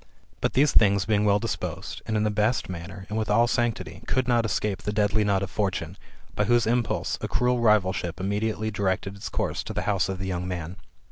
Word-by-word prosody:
But - - 0
these 140 +1 +4
things 100 -3 +4
being 105 0 +2
well 100 -1 +4
disposed, 95 -4 -4
and 110 -1 0
in 105 - +1
the 105 - +1
best 105 +3 +1
manner, 95 +2 -7
and 110 +2 -2
with 110 - -2
all 115 +3 +5
sanctity, 120 -2 -1
could 130 -1 +1
not 120 -2 +3
ei^cape 105 -2 -1
the 105 - -3
deadly 105 0 +2
nod 100 -2 +1
of 95 - -5
Fortune, 100 -3 -2 0.4
by 105 - +1
whose 120 +2 +3
impulse 115 -1 0
a - - -2
cruel 125 0 +1
rivalship 95 -5 +2
immediately 105 +3 -1
directed 100 -1 -1
its 100 - -6
course - - -2
to - - -6
the - - -1
house 100 -2 +1
of 95 - -2
the 95 - -4
young 90 -1 -3
man. 90 0 -5
105 Hz, 215 wpm, -26 LUFS, 95-110 Hz, 0.4 s, all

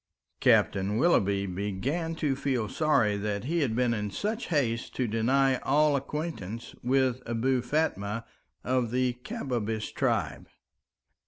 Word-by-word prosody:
Captain 100 +2 +3
Willoughby 100 - +3
began 105 - -2
to 145 -4 0
feel 130 -5 -1
sorry 115 -10 +2
that 100 0 -2
he 170 +6 0
had 130 -8 0
been 125 -1 +2
in 105 -2 -2
such 215 - -3
haste 125 -8 -1
to 130 - 0
deny 130 +4 +2
all 150 +1 +3
acquaintance 140 - -4
with 130 0 +1
Abou 120 +2 +1
Fatma 115 -6 -1 0.4
of 125 -2 +1
the 125 +1 +1
Kabbabish 115 - -3
tribe. - - -1
125 Hz, 130 wpm, -28 LUFS, 105-140 Hz, 0.4 s, Captain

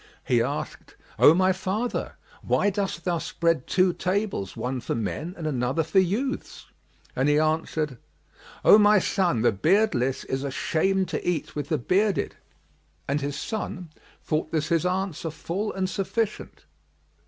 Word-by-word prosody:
He 120 -2 +3
asked, 140 +5 -4 0.2
"O 155 - +8
my 185 +1 +3
father, 195 +6 -2 0.3
why 205 - +2
dost 195 -4 -3
thou 175 -2 0
spread 165 -4 0
two 185 -1 +3
tables, 190 - -2
one 125 0 -3
for - - -3
men 115 - -3
and 165 - -6
another 135 +1 0
for 190 +5 +2
youths?"; 215 +10 -2 0.5
and 135 +3 +2
he 145 - +4
answered, 155 -3 0 0.7
"O 210 - +9
my 210 0 +6
son, 175 - +1
the - - +5
beardless 135 - +1
is 135 +1 -3
ashamed 185 +7 0
to - - -3
eat 175 - -3
with 145 -2 -4
the 155 - +1
bearded." 195 - +1 0.7
And 145 +2 0
his 140 0 -3
son 180 -6 -5 0.3
thought 155 0 -1
this 155 -1 -1
his 170 +1 +2
answer 185 -3 -2
full 185 +6 -3
and 190 -1 -1
sufficient. 210 +3 -3
170 Hz, 150 wpm, -25 LUFS, 145-195 Hz, 0.7 s, O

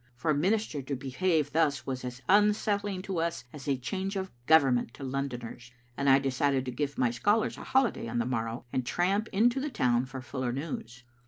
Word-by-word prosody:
For 155 +6 0
a - - +2
minister 190 -1 0
to 135 +1 -3
behave 145 +3 0
thus 145 -5 +1
was 130 -1 -4
as 125 +1 -6
unsettling 205 -1 +2
to 190 -4 -2
us 170 0 -1
as 145 -2 -9
a 140 -2 +2
change 190 +9 -3
of 190 -1 -3 0.2
Government 135 -6 +4
to - - -9
Londoners, 125 -3 -4 0.2
and 140 +1 +1
I 135 - +8
decided 135 0 +1
to 125 - -3
give 140 +3 -3
my 125 -2 +2
scholars 205 - +1
a - - -9
holiday 260 - +1
on 115 - -3
the 120 - +1
morrow 115 -1 -3
and 130 - 0
tramp 190 - 0
into 235 +6 +3
the 295 +3 -2
town 125 - +1
for 135 0 -7
fuller 130 -1 -3
news. 120 -4 -5
140 Hz, 200 wpm, -29 LUFS, 125-190 Hz, 0.2 s, I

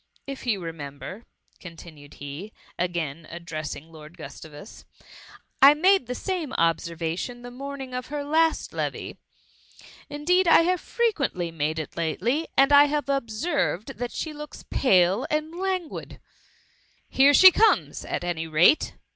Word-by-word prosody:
— - - -48
If 260 - -12
you 205 -5 0
remember, 165 +6 -8 0.3
continued 165 -4 -12
he, 145 +10 -8 0.3
again 170 -3 -3
addressing 165 -2 -7
Lord 155 +2 -13
Gustavus, 155 +2 -11 0.2
^^ - - -25 0.6
I 280 +2 +9
made 370 - +3
the 250 - -3
sdme 355 -6 -4
observation 170 +7 -2
the 245 - -8
morning 270 0 -7
of 250 0 -4
her 290 +1 -4
last 320 +2 +1
levee. - - -4 0.9
Indeed 345 +6 +1
I 330 - +7
have 360 +2 0
frequently 285 - -1
made 155 0 -2
it 155 - -6
lately, 230 - -1
and 275 +1 +5
I 285 0 +8
have 290 -1 -2
observed 270 - -2
that 245 -1 -3
she 315 - -5
looks 300 0 -10
pale 190 -2 +3
and 305 +1 -2
languid. 370 -2 -3
^^ - - -14 0.9
Here 280 +2 +5
she 375 +5 +9
comes, 445 +5 +2
at - - -4
any 165 -2 -3
rate 165 - +3
245 Hz, 145 wpm, -25 LUFS, -, 0.9 s, I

